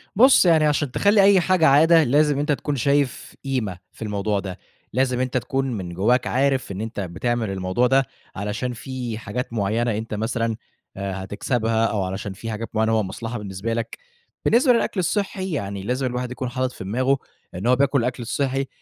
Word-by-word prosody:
بُص، 250 -2 +6
يعني 160 -3 +5
عشان 145 -3 +1
تخلّي 205 +6 +4
أي 195 -1 +6
حاجة 185 -2 +3
عادة، 160 +4 +6
لازم 145 +1 +3
أنت 150 +1 0
تكون 145 0 -1
شايف 140 +1 0
قيمة 125 -9 -2
في - - -20
الموضوع 105 -1 -1
ده. 95 -1 -6 0.3
لازم 125 0 +1
أنت 130 0 0
تكون 135 +2 -1
من 95 -6 -5
جوّاك 120 +8 +2
عارف 135 -4 +1
إن 95 - -5
أنت 115 -1 -5
بتعمل 105 +5 -2
الموضوع 95 +5 0
ده 135 +1 +3 0.3
علشان 105 +5 -3
في 120 -1 -5
حاجات 115 +3 -5
معيّنة 110 +2 0
أنت 110 0 -5
مثلًا 115 +1 -1 0.4
آآ 95 -1 -4
هتكسبها، 115 +3 0
أو 105 -3 0
علشان 95 +1 -4
في 115 +3 -6
حاجات 110 +1 -5
معيّنة 110 +1 +2
هو 110 -1 +2
مصلحة 115 +5 -5
بالنسبة 105 +2 -4
لك. 115 0 -4 0.5
بالنسبة 250 +2 +5
للأكل 230 -4 0
الصحّي، 190 +1 -1
يعني 100 - -3
لازم 125 +5 -1
الواحد 125 0 -3
يكون 125 0 -4
حاطط 130 +1 -1
في - - -9
دماغه 130 +8 +1 0.4
إن 95 +6 -3
هو 125 - +5
بياكل 140 +1 +2
الأكل 125 +1 -2
الصحّي 135 +3 -1
120 Hz, 185 wpm, -23 LUFS, 105-135 Hz, 0.5 s, بُص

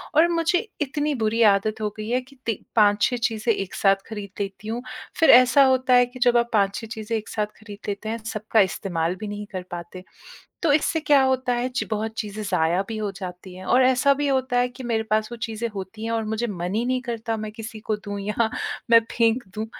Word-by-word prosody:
और 320 +3 +6
मुझे 345 +4 +1
इतनी 295 +1 -1
बुरी 225 +2 +1
आदत 215 +2 -2
हो 210 - 0
गई 215 +1 -5
है 250 +2 +1
कि 260 +2 -19
ती 225 -4 -1 0.2
5-6 210 +3 +4
चीज़ें 225 +1 0
एक 195 -2 -5
साथ 195 -1 +4
खरीद 210 -2 -6
लेती 195 +1 -5
हूँ, 230 +2 -3 0.4
फिर 325 - +5
ऐसा 255 +3 +7
होता 260 -1 +3
है 245 0 +6
कि 250 +1 -12
जब 245 -1 +4
आप 235 0 +1
5-6 205 +1 +1
चीज़ें 220 -1 -3
एक 215 - -7
साथ 210 -1 -1
खरीद 205 -2 -11
लेते 205 +1 -4
हैं, 225 - -2
सबका 220 0 -1
इस्तेमाल 180 -3 -1
भी 210 +3 -7
नहीं 205 0 -5
कर 185 -2 -4
पाते। 175 +1 -7 0.6
तो 325 -4 +3
इससे 315 +2 +2
क्या 295 -2 +4
होता 260 -1 +1
है, 245 +1 -1
ची 250 - -3
बहुत 220 0 -2
चीज़ें 215 0 -4
ज़ाया 180 -1 +1
भी 225 - -4
हो 210 -1 -2
जाती 185 -1 -8
हैं 185 +1 -10
और 250 +6 +4
ऐसा 260 +2 +4
भी 290 +1 -1
होता 260 -2 +1
है 245 0 +2
कि 250 +1 -11
मेरे 230 -2 0
पास 215 0 +2
वो - - -5
चीज़ें 225 +1 -3
होती 195 +3 -7
हैं 230 - -2
और 225 -1 0
मुझे 220 +2 -2
मन 180 -3 -4
ही 225 +2 +1
नहीं 255 0 0
करता, 230 -2 -3
मैं 215 -1 -5
किसी 220 0 -8
को 215 0 -2
दूँ 205 -1 -6
या 210 +3 0 0.4
मैं 230 0 +8
फेंक 230 +1 +2
दूँ। 215 +1 -3
220 Hz, 230 wpm, -24 LUFS, 205-250 Hz, 0.6 s, मैं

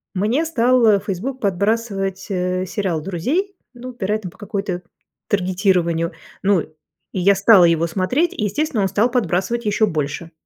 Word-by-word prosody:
Мне 230 - +1
стал, 250 -4 +3
а, 210 -3 +5
Facebook 220 +8 -4
подбрасывать, 200 -1 -1
э, 185 -1 -1
сериал 185 -6 -2
"Друзей", 270 - -2 0.2
ну, 250 +1 -9
вероятно, 205 -1 -2
по - - -20
какой-то 195 -3 -4 0.4
таргетированию. 180 -3 +1 0.3
Ну, 195 -4 +3
и - - -10 0.5
я 195 +3 +5
стала 200 -1 +6
его 170 0 +2
смотреть, 250 - 0
естественно, 215 +2 -1
он 195 - +2
стал 210 +6 +2
подбрасывать 235 -1 -1
ещё 210 +1 +2
больше. 155 0 -3
200 Hz, 145 wpm, -20 LUFS, 180-230 Hz, 0.5 s, стала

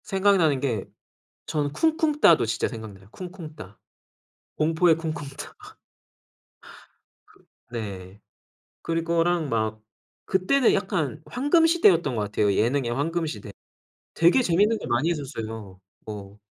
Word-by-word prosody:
생각나는 190 -7 +3
게 120 -8 -2 0.6
저는 145 -2 -1
쿵쿵따도 310 - +3
진짜 115 0 -1
생각나요. 105 -4 -10
쿵쿵따. 160 - -10 0.8
공포의 160 +2 +3
쿵쿵따 155 -4 -6 2.2
네. 100 -4 -7 0.6
그리고랑 165 0 0
막 110 -2 -1 0.5
그때는 210 +8 +3
약간 160 -7 -2
황금시대였던 290 - +3
것 105 - 0
같아요. 105 0 +1
예능의 120 +4 +1
황금시대. 145 -7 -3 0.6
되게 175 +10 +4
재미있는 205 +3 +2
게 - - -7
많이 120 +7 +1
있었어요. 110 - -6 0.3
뭐. 100 -1 -8
155 Hz, 245 characters per minute, -25 LUFS, 110-180 Hz, 2.2 s, 되게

